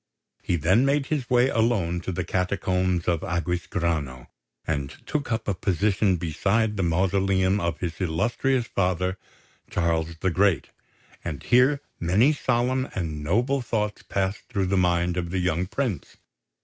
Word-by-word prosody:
He 90 Hz, -, 0 dB
then 95 Hz, -, +3 dB
made 140 Hz, +1 st, +2 dB
his 135 Hz, -5 st, -2 dB
way 125 Hz, +1 st, +4 dB
alone 105 Hz, -8 st, +1 dB
to 95 Hz, -, -4 dB
the 90 Hz, 0 st, -2 dB
Catacombs 90 Hz, -1 st, 0 dB
of 85 Hz, -3 st, +1 dB
Aquisgrano, 85 Hz, -6 st, -2 dB, 0.4 s
and 70 Hz, -3 st, -2 dB, 0.2 s
took 145 Hz, -4 st, -2 dB
up 110 Hz, 0 st, -1 dB
a 100 Hz, -, +1 dB
position 100 Hz, +1 st, +1 dB
beside 100 Hz, +7 st, 0 dB
the 95 Hz, -, -1 dB
mausoleum 95 Hz, +2 st, +2 dB
of 85 Hz, -3 st, -2 dB
his 85 Hz, +1 st, -4 dB
illustrious 115 Hz, -, 0 dB
father, 90 Hz, -2 st, -1 dB, 0.5 s
Charles 85 Hz, -1 st, 0 dB
the 95 Hz, -, +1 dB
Great; 95 Hz, -5 st, +2 dB, 0.5 s
and -, -, -5 dB
here 130 Hz, +4 st, +4 dB, 0.2 s
many 105 Hz, -, +3 dB
solemn 130 Hz, -1 st, 0 dB
and 80 Hz, -5 st, -3 dB
noble 120 Hz, -, +1 dB
thoughts 105 Hz, -3 st, -2 dB
passed 95 Hz, +1 st, -2 dB
through 100 Hz, -1 st, 0 dB
the 95 Hz, +2 st, 0 dB
mind 90 Hz, -1 st, +2 dB
of 85 Hz, -1 st, -2 dB
the 95 Hz, -, -2 dB
young 90 Hz, 0 st, 0 dB
prince. 115 Hz, -2 st, -3 dB
95 Hz, 150 wpm, -25 LUFS, 85-110 Hz, 0.5 s, way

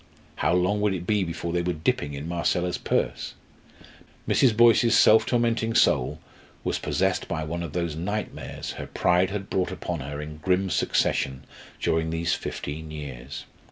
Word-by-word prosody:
How -, -, +1 dB
long 95 Hz, +4 st, +1 dB
would 105 Hz, -2 st, +2 dB
it 90 Hz, -1 st, -5 dB
be 105 Hz, 0 st, +2 dB
before 85 Hz, 0 st, -4 dB
they 90 Hz, -, +1 dB
were 90 Hz, +1 st, -1 dB
dipping 75 Hz, -2 st, -1 dB
in 70 Hz, +3 st, -6 dB
Marcella's 85 Hz, +1 st, 0 dB
purse? -, -, -1 dB, 0.9 s
Mrs. 115 Hz, -5 st, +3 dB
Boyce's 115 Hz, -1 st, +6 dB
self 110 Hz, 0 st, +6 dB
tormenting 115 Hz, -2 st, +1 dB
soul -, -, +3 dB, 0.4 s
was -, -, -1 dB
possessed -, -, 0 dB
by 80 Hz, -2 st, -2 dB
one 85 Hz, +3 st, -4 dB
of 85 Hz, -4 st, -5 dB
those 85 Hz, -3 st, -2 dB
nightmares 100 Hz, +6 st, -4 dB
her -, -, -6 dB
pride 90 Hz, +1 st, +2 dB
had 100 Hz, -1 st, -4 dB
brought 95 Hz, -1 st, -1 dB
upon 85 Hz, -2 st, -4 dB
her 70 Hz, +2 st, -5 dB
in 75 Hz, 0 st, -7 dB
grim 95 Hz, +3 st, +1 dB
succession 65 Hz, -2 st, 0 dB, 0.3 s
during 80 Hz, 0 st, +1 dB
these 80 Hz, +1 st, 0 dB
fifteen 80 Hz, +2 st, -5 dB
years. 70 Hz, -4 st, -7 dB
85 Hz, 160 wpm, -26 LUFS, 75-100 Hz, 0.9 s, Boyce's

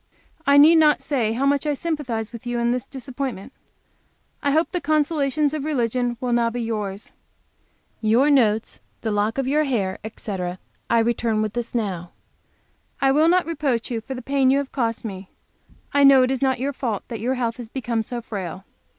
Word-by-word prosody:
I 280 Hz, 0 st, +6 dB
need 315 Hz, +3 st, +8 dB
not 305 Hz, -2 st, +4 dB
say 235 Hz, -7 st, 0 dB
how 260 Hz, +4 st, 0 dB
much 280 Hz, +1 st, +1 dB
I 295 Hz, -, +1 dB
sympathize 260 Hz, -9 st, -3 dB
with 235 Hz, +1 st, -9 dB
you 240 Hz, 0 st, -1 dB
in 235 Hz, 0 st, +1 dB
this 250 Hz, -1 st, -2 dB
disappointment. 265 Hz, -3 st, -6 dB, 0.9 s
I 285 Hz, -, +1 dB
hope 315 Hz, +4 st, +2 dB
the 360 Hz, -2 st, -2 dB
consolations 300 Hz, -1 st, +1 dB
of 305 Hz, -3 st, -3 dB
religion 245 Hz, -4 st, -1 dB
will 250 Hz, -1 st, -1 dB
now 235 Hz, -1 st, +2 dB
be 245 Hz, +1 st, -5 dB
yours. 210 Hz, -3 st, -4 dB, 0.9 s
Your 235 Hz, +7 st, +4 dB
notes, 225 Hz, -5 st, +2 dB, 0.2 s
the 220 Hz, -, -2 dB
lock 210 Hz, +3 st, 0 dB
of 270 Hz, -1 st, -1 dB
your 300 Hz, +3 st, +2 dB
hair, 200 Hz, -9 st, -1 dB
etc., 190 Hz, -4 st, -5 dB, 0.3 s
I 235 Hz, -, +3 dB
return 225 Hz, -1 st, +1 dB
with 215 Hz, -1 st, -3 dB
this 240 Hz, 0 st, -4 dB
now. 185 Hz, -7 st, -2 dB, 0.9 s
I 270 Hz, -1 st, +3 dB
will 310 Hz, +4 st, +4 dB
not 360 Hz, +1 st, +3 dB
reproach 280 Hz, -8 st, -1 dB
you 230 Hz, -2 st, -2 dB
for 265 Hz, +4 st, -6 dB
the 250 Hz, -, -7 dB
pain 270 Hz, 0 st, +2 dB
you 270 Hz, -, +4 dB
have 280 Hz, -1 st, -3 dB
cost 230 Hz, -4 st, -2 dB
me; 190 Hz, -3 st, -7 dB, 0.6 s
I 285 Hz, 0 st, +4 dB
know 275 Hz, -2 st, +8 dB
it 255 Hz, -, +1 dB
is 265 Hz, -, -2 dB
not 265 Hz, -1 st, +2 dB
your 280 Hz, +2 st, -1 dB
fault 230 Hz, -7 st, -3 dB
that 230 Hz, -3 st, -5 dB
your 255 Hz, +3 st, 0 dB
health 235 Hz, -2 st, -2 dB
has 240 Hz, -3 st, -8 dB
become 240 Hz, -3 st, -2 dB
so 240 Hz, +2 st, -5 dB
frail. 190 Hz, -3 st, -6 dB
245 Hz, 195 wpm, -23 LUFS, 225-280 Hz, 0.9 s, need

